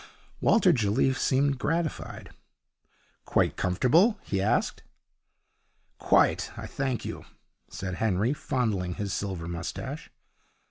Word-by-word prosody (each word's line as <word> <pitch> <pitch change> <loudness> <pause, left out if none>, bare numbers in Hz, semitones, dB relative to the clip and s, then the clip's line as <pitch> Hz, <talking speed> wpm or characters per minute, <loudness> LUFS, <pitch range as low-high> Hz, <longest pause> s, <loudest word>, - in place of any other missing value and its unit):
Walter 190 -6 +4
Jelliffe 125 +3 +1
seemed 135 +1 +2
gratified. 165 +1 -3 0.9
'Quite - - +1
comfortable?' 150 - +3
he 100 -1 -1
asked. 105 - 0 1.2
'Quite, - - +3
I - - -6
thank 135 -3 -3
you,' - - -6 0.4
said 95 -1 -5
Henry, 110 +3 +2
fondling 105 -11 -1
his 100 -1 -3
silver 95 -5 -3
moustache. 85 -1 -5
115 Hz, 100 wpm, -27 LUFS, 95-140 Hz, 1.2 s, Walter